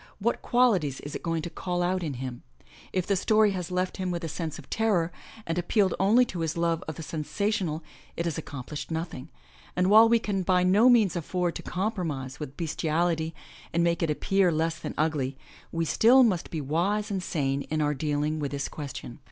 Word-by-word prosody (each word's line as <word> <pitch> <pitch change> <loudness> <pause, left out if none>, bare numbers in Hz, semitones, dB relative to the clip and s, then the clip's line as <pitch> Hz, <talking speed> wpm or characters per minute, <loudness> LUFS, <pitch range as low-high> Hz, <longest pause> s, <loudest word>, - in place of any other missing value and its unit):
What 230 +4 0
qualities 195 - +2
is 145 - -7
it - - -4
going 165 -2 -1
to 170 - -4
call 175 -1 -2
out 185 +1 0
in 150 -5 -3
him? 125 -1 -6 0.5
If 185 -2 0
the 200 - +1
story 215 +2 +4
has 180 -2 -4
left 180 0 -1
him 185 -1 -2
with 175 -1 -3
a - - -2
sense 160 0 -4
of 150 - -12
terror, 200 -7 +1 0.3
and 165 +1 -1
appealed 190 +2 +2
only 225 +6 +5
to 185 -7 -6
his 165 0 -2
love 170 0 0
of 155 - -4
the 165 - -7
sensational, 170 +1 -2 0.3
it 170 - -1
has 170 - -1
accomplished 145 -2 -6
nothing, 160 -3 -4 0.5
and 180 +2 +2
while 220 +2 +8
we 235 - +5
can 205 -4 -1
by 180 0 +3
no 205 +7 +5
means 220 -7 +4
afford 175 +1 -1
to - - -8
compromise 165 - -3
with 145 -3 -7
bestiality 165 0 0 0.4
and 170 +1 +2
make 170 -1 +1
it 165 - +1
appear 190 +4 +2
less 160 +1 0
than - - -6
ugly, 145 -4 0 0.3
we 165 0 -1
still 245 - +6
must 190 -8 +1
be 160 - -3
wise 185 +9 0
and 195 -2 -1
sane 140 -6 -1
in 155 - -1
our 150 -1 +2
dealing 150 +2 -1
with 145 -2 -2
this 140 0 -3
question. 140 -4 -7
170 Hz, 205 wpm, -27 LUFS, 155-190 Hz, 0.5 s, while